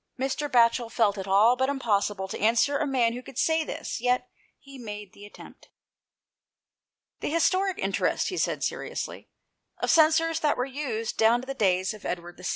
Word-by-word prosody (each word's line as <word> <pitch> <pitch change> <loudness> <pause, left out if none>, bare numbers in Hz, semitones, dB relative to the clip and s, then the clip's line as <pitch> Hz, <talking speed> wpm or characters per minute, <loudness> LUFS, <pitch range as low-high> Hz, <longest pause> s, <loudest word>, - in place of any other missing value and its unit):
Mr. 270 +2 -2
Batchel 235 -1 +3
felt 215 -4 +1
it 190 - -6
all 210 +5 +5
but 260 +1 0
impossible 205 -7 -1
to - - -6
answer 230 +6 +2
a 305 - 0
man 245 -4 +1
who 245 - -6
could 255 - -13
say 320 +2 +2
this; 300 - -5
yet 250 0 0 0.3
he 275 -1 -14
made 210 -4 -8
the 205 0 -12
attempt. - - -15 0.7
" - - -65
The - - -2
historic 370 +4 +1
interest," 195 0 0
he 370 - -5
said - - -1
seriously, - - -4 0.3
" - - -53
of - - +1
censers 325 0 +4
that 300 -2 +1
were 250 - 0
used 255 -5 -4
down 225 +2 +4
to - - -10
the 270 - -4
days 190 -5 +1
of 215 - -13
Edward 175 0 -5
VI. 180 - -14
245 Hz, 190 wpm, -26 LUFS, 210-280 Hz, 0.7 s, all